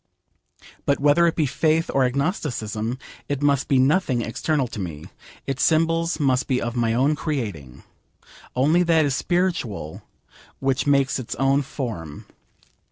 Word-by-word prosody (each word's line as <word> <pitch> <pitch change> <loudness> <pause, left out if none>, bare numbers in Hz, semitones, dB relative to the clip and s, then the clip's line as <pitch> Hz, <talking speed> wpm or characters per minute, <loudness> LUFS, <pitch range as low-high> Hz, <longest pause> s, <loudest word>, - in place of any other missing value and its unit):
But 140 - +2
whether 150 +4 +4
it 165 - 0
be 155 - +1
faith 160 +4 +1
or 135 -1 +3
agnosticism, 125 - -2 0.3
it 145 0 -2
must 140 -2 +2
be 135 - +3
nothing 130 -2 +2
external 140 +5 -1
to 105 - -7
me. 80 -6 -6 0.4
Its 135 -1 -3
symbols 165 +1 +2
must 130 -3 +1
be 130 -2 +1
of 120 +1 -3
my 115 -2 +1
own 140 +5 +2
creating. 105 - -5 0.7
Only 150 +7 +3
that 165 -3 +3
is 140 -2 0
spiritual 165 - -2 0.6
which 135 +1 -1
makes 140 -1 +2
its 125 - -5
own 135 +1 +2
form. 110 - -6
135 Hz, 145 wpm, -23 LUFS, 120-155 Hz, 0.7 s, whether